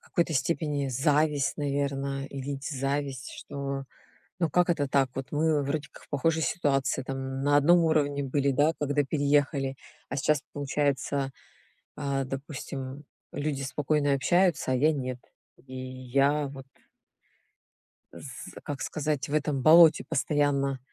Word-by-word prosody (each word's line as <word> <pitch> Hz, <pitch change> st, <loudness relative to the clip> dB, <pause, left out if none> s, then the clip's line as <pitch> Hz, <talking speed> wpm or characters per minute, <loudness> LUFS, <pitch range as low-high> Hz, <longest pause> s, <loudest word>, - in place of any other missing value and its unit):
какой-то 170 Hz, -1 st, -1 dB
степени 145 Hz, 0 st, 0 dB
зависть, 145 Hz, +1 st, +1 dB
наверно, 140 Hz, -1 st, -2 dB
и 140 Hz, -1 st, -7 dB
ведь 140 Hz, +1 st, -5 dB
зависть, 135 Hz, -1 st, -2 dB
что 140 Hz, -1 st, -5 dB, 0.5 s
ну 170 Hz, -2 st, +1 dB
как 180 Hz, +3 st, +2 dB
это 145 Hz, -4 st, +1 dB
так, 135 Hz, -1 st, +2 dB
вот 135 Hz, 0 st, -5 dB
мы 150 Hz, -1 st, +2 dB
вроде 150 Hz, +2 st, -2 dB
как -, -, -15 dB
в -, -, -26 dB
похожей 160 Hz, +3 st, +1 dB
ситуации, 135 Hz, -5 st, 0 dB
там, 135 Hz, 0 st, -4 dB
на 145 Hz, +1 st, +4 dB
одном 170 Hz, +5 st, +6 dB
уровне 145 Hz, -3 st, +1 dB
были, 140 Hz, +1 st, +1 dB
да, 145 Hz, +4 st, +3 dB
когда 145 Hz, 0 st, +1 dB
переехали, 140 Hz, -1 st, +1 dB, 0.3 s
а -, -, -4 dB
сейчас, 145 Hz, +1 st, +1 dB
получается, 140 Hz, -1 st, -1 dB, 0.7 s
а, 140 Hz, -2 st, -1 dB
допустим, 135 Hz, 0 st, -6 dB, 0.3 s
люди 145 Hz, -2 st, -2 dB
спокойно 145 Hz, +2 st, +1 dB
общаются, 175 Hz, 0 st, +2 dB
а -, -, +3 dB
я 155 Hz, +5 st, +3 dB
нет. 130 Hz, -3 st, -4 dB, 0.4 s
И 130 Hz, 0 st, -12 dB
я 130 Hz, +3 st, 0 dB
вот 135 Hz, -1 st, -9 dB, 1.5 s
с 135 Hz, -2 st, -9 dB
как 145 Hz, -3 st, -5 dB
сказать, 150 Hz, -1 st, -2 dB
в 145 Hz, -, -3 dB
этом 145 Hz, -3 st, 0 dB
болоте 160 Hz, 0 st, +7 dB
постоянно, 140 Hz, -2 st, +1 dB
140 Hz, 140 wpm, -28 LUFS, 135-150 Hz, 1.5 s, болоте